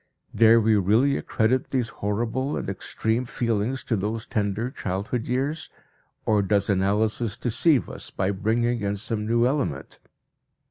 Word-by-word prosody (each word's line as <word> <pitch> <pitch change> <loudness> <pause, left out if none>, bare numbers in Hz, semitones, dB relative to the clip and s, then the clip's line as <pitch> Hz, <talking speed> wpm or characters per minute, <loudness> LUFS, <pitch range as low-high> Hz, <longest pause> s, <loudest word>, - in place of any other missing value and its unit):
Dare 115 0 +6
we 110 0 +3
really 110 +9 +3
accredit 125 +4 0
these 125 -4 0
horrible 115 +8 -2
and - - -4
extreme 110 +4 -2
feelings 115 +1 -1
to 115 - 0
those 110 +3 -3
tender 105 +3 -1
childhood 105 +1 -3
years, 140 +6 -2 0.6
or 105 -2 +3
does 100 +1 +1
analysis 105 +3 0
deceive 125 - +2
us - - -7
by 95 +1 -1
bringing 115 +4 0
in 100 0 -1
some 105 +1 -3
new 120 +1 +3
element? 130 - -2
110 Hz, 140 wpm, -25 LUFS, 100-125 Hz, 0.6 s, Dare